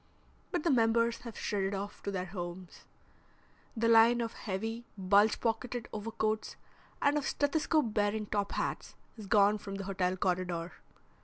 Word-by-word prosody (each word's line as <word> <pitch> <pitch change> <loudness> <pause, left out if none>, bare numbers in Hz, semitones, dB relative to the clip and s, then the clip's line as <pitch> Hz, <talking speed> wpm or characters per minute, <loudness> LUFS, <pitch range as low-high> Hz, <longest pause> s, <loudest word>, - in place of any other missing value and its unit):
But 350 -5 -1
the 335 - +3
members 230 -1 +3
have 235 -3 -9
shredded 200 -1 -1
off 200 +1 -6
to - - -4
their 185 -2 -2
homes. 175 -1 -7 0.9
The 230 +1 +2
line 230 +1 +6
of 230 -1 -2
heavy, 225 +4 -4
bulge 200 +3 +4
pocketed 240 +1 -2
overcoats 215 0 -2 0.5
and 290 +1 +4
of 280 - -4
stethoscope 290 -4 +1
bearing 210 0 +1
top 200 -1 -2
hats - - -3 0.2
is 215 -4 -9
gone 205 0 +4
from 195 -1 -6
the 195 - -4
hotel 185 -1 -1
corridor. 180 -2 -1
210 Hz, 150 wpm, -32 LUFS, 195-230 Hz, 0.9 s, line